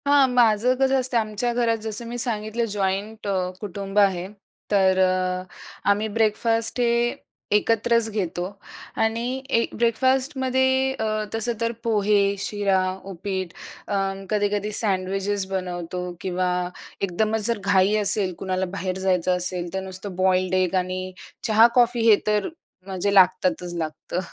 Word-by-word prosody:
हां, 285 -1 +5
माझं 245 0 +3
कसं 270 0 +2
असतं, 255 -1 -1
आमच्या 215 +2 0
घरात 235 -1 +1
जसं 220 +1 -5
मी 240 +1 -5
सांगितलं 230 -1 -2
जॉईंट 205 +2 -2
अ, 200 - 0 0.3
कुटुंब 200 0 -3
आहे, 190 -3 +2 0.4
तर 190 -2 +3
अ, 185 0 +1 0.5
आम्ही 205 +2 +2
ब्रेकफास्ट 225 +2 +1
हे 240 - +3 0.7
एकत्रच 230 +1 +1
घेतो 180 -4 -3 0.6
आणि 225 +1 -1 0.3
एक 230 - -3
ब्रेकफास्टमध्ये 260 +2 +1
अ, 220 - -3 0.3
तसं 225 +2 -1
तर 230 0 +1
पोहे, 205 -2 +2
शिरा, 200 -1 0 0.3
उपीट, 190 -1 -4 0.3
अ, 205 - -2 0.3
कधी-कधी 205 0 0
सँडविचेस 195 0 -1
बनवतो 180 -1 -4 0.2
किंवा 185 -1 -1 0.5
एकदमच 215 +3 +1
जर 230 -3 0
घाई 195 +1 +3
असेल, 200 -2 +6
कुणाला 190 0 -1
बाहेर 185 -1 -3
जायचं 185 -1 +1
असेल 180 -1 -3
तर 190 - -1
नुसतं 190 0 -7
बॉइल्ड 185 0 +1
एग 185 +1 -2
आणि 185 0 -4 0.4
चहा-कॉफी 235 +1 +4
हे 215 - +8
तर 210 -2 +1 0.4
म्हणजे 195 +1 -1
लागतातच 180 -2 +3
लागतं. 160 +2 -4
205 Hz, 130 wpm, -23 LUFS, 185-230 Hz, 0.7 s, हे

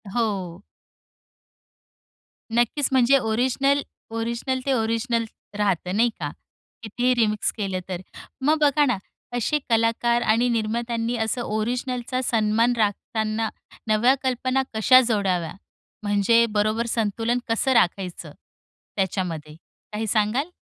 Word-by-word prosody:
हो. 195 -6 -2 1.9
नक्कीच 240 +4 +2
म्हणजे 260 +1 +5
ओरिजिनल 260 +4 +1 0.3
ओरिजिनल 235 +3 -2
ते 275 - +2
ओरिजिनल 230 0 0 0.3
राहतं 185 -3 0
नाही 235 +3 +4
का? 145 -3 -3 0.5
कितीही 245 +4 +1
रिमिक्स 215 -3 +1
केलं 195 -3 -2
तर. 180 -1 -4 0.4
मग 300 +4 +3
बघा 295 0 +4
ना, 250 -6 +1 0.4
असे 300 +6 +1
कलाकार 230 +1 +2
आणि 235 +2 +2
निर्मात्यांनी 230 +1 -1
असं 240 +3 -2
ओरिजिनलचा 245 +3 -2
सन्मान 225 0 +2
राखताना 220 +1 -1 0.4
नव्या 225 +5 +4
कल्पना 260 +1 0
कशा 250 +4 +6
जोडाव्या? 185 -7 0 0.5
म्हणजे 205 +3 +3
बरोबर 215 +2 0
संतुलन 230 +1 0
कसं 230 +4 +2
राखायचं 185 -4 0 0.7
त्याच्यामध्ये, 175 -6 -2 0.4
काही 215 +1 -3
सांगाल? 220 - +1
230 Hz, 110 wpm, -24 LUFS, 210-245 Hz, 1.9 s, कशा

